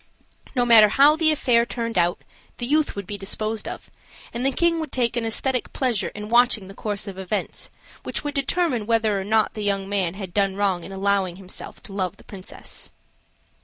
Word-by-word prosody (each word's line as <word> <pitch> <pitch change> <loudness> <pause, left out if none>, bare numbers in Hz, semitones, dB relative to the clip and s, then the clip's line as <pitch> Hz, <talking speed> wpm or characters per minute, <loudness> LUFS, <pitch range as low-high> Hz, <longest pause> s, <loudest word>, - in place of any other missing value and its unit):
No 245 -1 +3
matter 225 -3 +8
how 285 +7 +6
the 320 0 +4
affair 245 -6 +3
turned 230 -1 -4
out, 175 -1 +1 0.3
the 240 - -3
youth 300 +4 +1
would 200 -1 -5
be 205 +2 -6
disposed 215 +3 -3
of, - - -8 0.4
and 240 - -2
the 270 - +3
king 335 +3 +2
would 315 - -4
take 240 -2 +1
an 230 -2 -1
aesthetic 250 +3 0
pleasure 250 -6 0
in 210 0 -6
watching 235 -3 +3
the 195 - -10
course 205 0 -3
of 190 -1 -7
events, 190 +2 -3 0.3
which - - -4
would 290 -1 -3
determine 275 -5 0
whether 220 -3 +2
or - - -4
not 215 +1 +2
the 215 - -6
young 200 -1 0
man 190 -3 0
had 190 -3 -7
done 195 -2 +1
wrong 195 -3 0
in 195 - -9
allowing 195 -2 +1
himself 190 0 -6
to 200 - -10
love 190 -1 -2
the - - -17
princess. 195 -2 -8
215 Hz, 200 wpm, -23 LUFS, 195-245 Hz, 0.4 s, matter